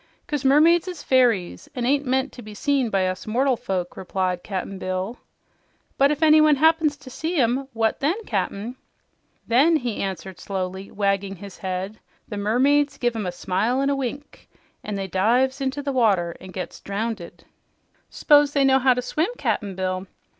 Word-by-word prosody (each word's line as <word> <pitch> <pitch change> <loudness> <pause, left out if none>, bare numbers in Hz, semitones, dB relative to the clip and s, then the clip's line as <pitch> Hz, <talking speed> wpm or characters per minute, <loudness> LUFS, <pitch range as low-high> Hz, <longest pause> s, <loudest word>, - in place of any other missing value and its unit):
"'Cause 295 -5 -3
mermaids 320 +6 +5
is 355 -5 -6
fairies, 240 -9 +1
an' 245 -2 -2
ain't 280 +2 +1
meant 265 +2 +1
to 245 - -10
be 215 -1 -10
seen 275 0 +1
by 195 -3 +1
us 185 +2 -4
mortal 255 +4 +2
folk," 185 -5 -3
replied 185 -1 -2
Cap'n 190 0 -5
Bill. 185 +6 -3 0.8
"But 275 +1 +4
if 300 +1 -1
anyone 310 -1 +6
happens 315 0 +3
to 260 -2 -13
see 325 +7 -3
'em, 260 +1 +1
what 225 -1 0
then, 295 +6 +1
Cap'n?" 205 +4 -3 0.7
"Then," 280 +8 +4
he 245 -7 -2
answered, 190 -1 -5
slowly 190 0 -4
wagging 200 -1 -1
his 195 +1 -11
head, 190 +3 -4 0.3
"the 210 - -6
mermaids 275 +7 +2
give 240 -2 0
'em 210 -4 -3
a - - -1
smile 200 +8 -1
an' 275 +1 +1
a - - +1
wink, 275 +2 -6 0.3
an' 210 - -4
they 195 -1 -3
dive 235 +8 +2
into 270 +2 -2
the 280 -1 -2
water 195 -9 +2
an' 185 - -10
gets 185 -2 -6
drownded." 200 -3 -5 0.7
"S'pose 290 -1 +4
they 280 - +3
knew 265 0 +5
how 260 -1 +4
to 250 - -2
swim, 315 - 0
Cap'n 200 -4 -2
Bill?" 185 0 -3
235 Hz, 175 wpm, -23 LUFS, 195-275 Hz, 0.8 s, anyone